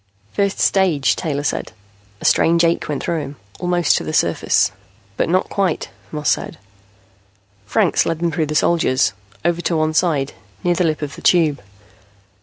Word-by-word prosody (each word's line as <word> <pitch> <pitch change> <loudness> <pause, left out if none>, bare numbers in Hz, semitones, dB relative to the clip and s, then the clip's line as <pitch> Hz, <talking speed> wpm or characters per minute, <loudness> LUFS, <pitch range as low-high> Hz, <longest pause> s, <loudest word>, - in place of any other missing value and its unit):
"First 200 -1 0
stage," 180 -8 +2
Taylor 145 -4 -2
said. 140 - -2 0.5
A - - -6
strange 170 +1 +4
ache 170 -1 +1
went 145 -2 -2
through 170 - -1
him. 145 -1 -6 0.2
"Almost 175 -1 +2
to - - -3
the 155 - -5
surface." 85 - +2 0.4
"But - - 0
not 185 +2 +2
quite," 190 -5 -1 0.2
Moss 150 -1 0
said. - - -2 1.1
Franks - - +2
led 165 - 0
them 170 +1 -1
through 160 -2 -1
the 150 - -3
soldiers, 150 -7 +2 0.3
over 175 0 +1
to 170 -1 0
one 155 0 +1
side, 155 -5 +1 0.3
near 175 - +3
the 175 +1 +1
lip 155 -1 -1
of 145 0 -5
the - - -11
Tube. 160 -5 +3
165 Hz, 170 wpm, -19 LUFS, 150-175 Hz, 1.1 s, strange